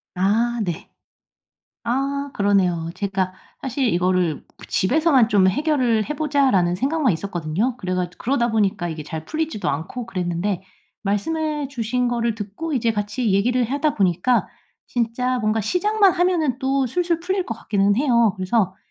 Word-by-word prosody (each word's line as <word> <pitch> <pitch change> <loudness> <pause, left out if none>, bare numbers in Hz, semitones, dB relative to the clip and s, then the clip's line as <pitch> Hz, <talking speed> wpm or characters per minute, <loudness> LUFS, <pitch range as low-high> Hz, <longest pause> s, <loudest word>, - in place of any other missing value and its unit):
아 225 +6 +1
네. 175 -3 -5 1.0
아 275 +3 -1
그러네요. 185 -5 +2
제가 195 -2 -1 0.3
사실 265 0 -1
이거를 180 -3 +1
그 - - -13
'집에서만 270 - +3
좀 195 -3 +4
해결을 250 - +1
해 300 - -2
보자.'라는 270 - +2
생각만 275 - +1
있었거든요. 180 +6 -2
그래가 185 -4 -2
그러다 240 -2 +1
보니까 205 -4 +1
이게 160 -2 -5
잘 160 +1 -6
풀리지도 315 -8 -2
않고 165 - -3
그랬는데 180 -1 -2 0.4
말씀해 295 +9 -1
주신 250 -1 -1
거를 235 -2 0
듣고 215 +11 -5
이제 230 -2 +1
같이 210 +1 -1
얘기를 240 +5 +2
하다 285 +3 0
보니까 195 +5 +2 0.4
진짜 250 +2 -1
뭔가 215 0 +1
시작만 395 - +3
하면은 340 -8 +1
또 265 0 +1
술술 345 +5 0
풀릴 375 +2 -1
것 230 - -4
같기는 205 -2 +1
해요. 235 -5 +3
그래서 190 0 0
230 Hz, 325 characters per minute, -22 LUFS, 195-275 Hz, 1.0 s, 좀